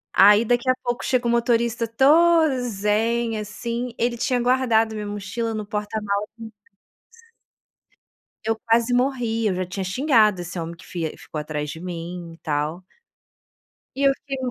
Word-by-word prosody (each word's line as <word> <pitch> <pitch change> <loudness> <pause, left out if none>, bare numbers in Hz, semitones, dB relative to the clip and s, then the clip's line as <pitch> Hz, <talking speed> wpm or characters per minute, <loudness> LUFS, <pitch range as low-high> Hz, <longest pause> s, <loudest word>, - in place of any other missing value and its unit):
Aí 205 +2 +7
daqui 245 +2 +1
a 255 - +4
pouco 240 0 -2
chega 250 -2 +1
o - - +2
motorista 235 0 +1
todo 305 +4 +4
zen, 225 +1 0
assim, 235 +3 -4
ele 235 0 0
tinha 250 +1 0
guardado 240 -3 +2
minha 210 -1 -5
mochila 205 +3 -3
no 215 -1 -4
porta-mala 210 0 -2
do 230 - -9
ônibus. 215 -2 -13 1.8
Eu 225 0 +1
quase 230 +1 +2
morri, 245 -3 +1
eu 190 - 0
já 185 0 -2
tinha 190 +2 -5
xingado 215 - +3
esse 175 0 -6
homem 165 +1 -5
que 165 - -16
fi 165 -3 -4
ficou 155 - -7
atrás 150 0 -4
de 160 - -7
mim 175 -1 -6
e - - -15
tal. 155 +3 -2 1.1
E 270 - -4
eu 275 - +4
fiquei 275 -1 -4
225 Hz, 160 wpm, -23 LUFS, 195-240 Hz, 1.8 s, Aí